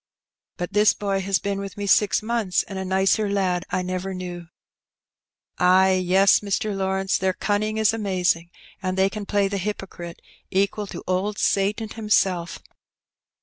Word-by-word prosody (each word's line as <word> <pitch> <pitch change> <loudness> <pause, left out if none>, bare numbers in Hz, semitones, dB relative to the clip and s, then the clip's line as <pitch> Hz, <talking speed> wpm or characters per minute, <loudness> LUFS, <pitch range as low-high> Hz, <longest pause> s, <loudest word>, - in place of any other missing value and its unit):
"But 175 +3 -5
this 210 +1 +4
boy 195 -1 -1
has 195 0 +1
been 200 -1 -3
with 200 0 -7
me 205 - -3
six 205 +2 +3
months, 220 -5 0
and 195 -1 -7
a - - -3
nicer 190 +3 +1
lad 185 -3 0
I 185 - -1
never 185 +1 -4
knew," 175 -2 -7 1.1
"Ay, 185 +1 +5
yes, 190 +2 +5
Mr. 205 +1 -2
Lawrence, 190 0 0
their 190 0 +1
cunning 210 +3 -1
ia 220 - -1
amazing; 185 -5 0 0.3
and 185 0 -2
t^iey 190 +1 +3
cao 210 -1 -6
play 200 -1 +2
the 200 0 -3
hypocrite 185 -3 -6 0.3
equ^ 200 +1 0
to - - -7
old 195 +3 -1
Satan 205 +3 0
himself. 195 -6 0
195 Hz, 155 wpm, -23 LUFS, 185-205 Hz, 1.1 s, Ay